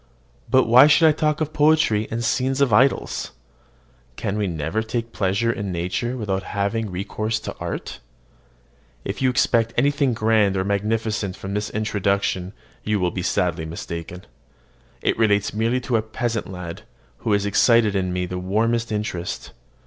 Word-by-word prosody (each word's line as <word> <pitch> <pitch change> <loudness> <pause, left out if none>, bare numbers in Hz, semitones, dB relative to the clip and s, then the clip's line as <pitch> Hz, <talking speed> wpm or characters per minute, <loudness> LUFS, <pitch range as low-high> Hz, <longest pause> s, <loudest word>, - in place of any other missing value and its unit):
But 130 0 +5
why 125 +5 +7
should 155 +2 +5
I - - +6
talk 150 0 0
of 155 0 -2
poetry 150 -9 +3
and 115 +1 -3
scenes 130 +3 0
and 140 -4 +3
idyls? 130 +5 +2 0.8
Can 100 - -3
we 105 -1 0
never 80 +5 -2
take 115 +1 -4
pleasure 100 +4 0
in 100 -4 -4
nature 90 +9 -2
without 100 -4 -2
having 100 +3 -2
recourse 110 +4 -3
to - - -6
art? - - -5 1.1
If 100 +5 -4
you 130 - +3
expect 115 -3 +1
anything 140 -1 +2
grand 110 -3 +2
or 95 - +1
magnificent 105 -1 -1
from 95 +1 -6
this 105 +1 -2
introduction, 100 -3 -1 0.3
you 105 -1 0
will 90 -1 +1
be 90 - -4
sadly 85 -3 0
mistaken. 85 +2 -7 0.8
It - - +1
relates 105 -2 +2
merely 115 +4 +1
to 120 -2 0
a - - +1
peasant 115 0 -3
lad, 90 -3 -7 0.4
who 110 - 0
has 100 0 +1
excited 110 +1 +4
in 95 -2 0
me 90 0 -1
the 90 0 -5
warmest 115 +5 0
interest. 105 -5 -4
105 Hz, 160 wpm, -22 LUFS, 95-120 Hz, 1.1 s, why